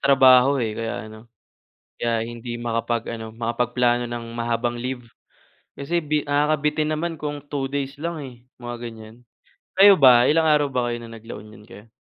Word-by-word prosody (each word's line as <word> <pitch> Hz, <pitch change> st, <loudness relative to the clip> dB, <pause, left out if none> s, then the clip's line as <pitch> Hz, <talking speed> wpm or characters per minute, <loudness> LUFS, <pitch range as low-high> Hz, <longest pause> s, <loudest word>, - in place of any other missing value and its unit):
trabaho, 135 Hz, 0 st, +5 dB
eh, 115 Hz, -5 st, -1 dB
kaya 115 Hz, 0 st, -4 dB
ano, 110 Hz, +2 st, -13 dB, 0.7 s
kaya 115 Hz, -1 st, 0 dB
hindi 120 Hz, 0 st, -7 dB
makapag-ano, 115 Hz, -1 st, -3 dB
makapagplano 120 Hz, +1 st, 0 dB
ng 120 Hz, -1 st, -5 dB
mahabang 120 Hz, 0 st, -2 dB
leave, 125 Hz, -1 st, -5 dB, 0.7 s
kasi 155 Hz, +5 st, -2 dB
bi 150 Hz, -2 st, -1 dB
nakakabitin 150 Hz, +1 st, 0 dB
naman 165 Hz, +1 st, -3 dB
kung 145 Hz, -1 st, -5 dB
2 140 Hz, -2 st, -2 dB
days 140 Hz, 0 st, -4 dB
lang, 170 Hz, +2 st, -4 dB
eh, 130 Hz, -3 st, -9 dB, 0.3 s
mga 120 Hz, 0 st, -5 dB
ganyan. 110 Hz, -1 st, -11 dB, 0.6 s
Kayo 200 Hz, 0 st, +9 dB
ba, 125 Hz, -5 st, +6 dB
ilang 160 Hz, +2 st, +3 dB
araw 150 Hz, -1 st, +3 dB
ba 125 Hz, -3 st, -1 dB
kayo 120 Hz, -, -4 dB
no'ng 115 Hz, -1 st, -10 dB
nag-La 115 Hz, +1 st, -10 dB
Union 105 Hz, 0 st, -14 dB
kayo? 110 Hz, -1 st, -14 dB
120 Hz, 160 wpm, -23 LUFS, 115-145 Hz, 0.7 s, Kayo